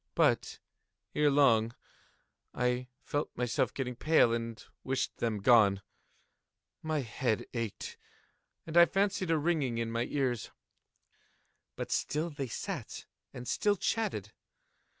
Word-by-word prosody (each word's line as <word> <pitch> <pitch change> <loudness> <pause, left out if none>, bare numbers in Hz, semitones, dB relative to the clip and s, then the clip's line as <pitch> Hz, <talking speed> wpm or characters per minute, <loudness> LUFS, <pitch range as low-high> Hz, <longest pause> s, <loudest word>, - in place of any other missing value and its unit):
But, - - +2 0.6
ere 150 -1 +3
long, 120 -5 +4 0.8
I 125 0 0 0.2
felt 145 +1 -2
myself 125 -1 0
getting 125 -2 -4
pale 155 -4 +4
and 115 -1 -4 0.2
wished 130 0 -2
them 110 -3 -1
gone. 100 -4 +5 1.0
My 155 -2 -1
head 115 -1 -1
ached, 115 -4 -4 0.7
and 165 +1 -2
I 170 0 +9
fancied 195 -2 0
a 165 - +3
ringing 150 -6 0
in 115 -1 -2
my 115 +1 0
ears: 130 -5 -1 1.3
but - - -5
still 160 +3 -1
they 140 -2 -4
sat - - -5 0.3
and 125 0 -8
still 205 -1 +2
chatted. 225 +3 -2
125 Hz, 120 wpm, -31 LUFS, 115-155 Hz, 1.3 s, I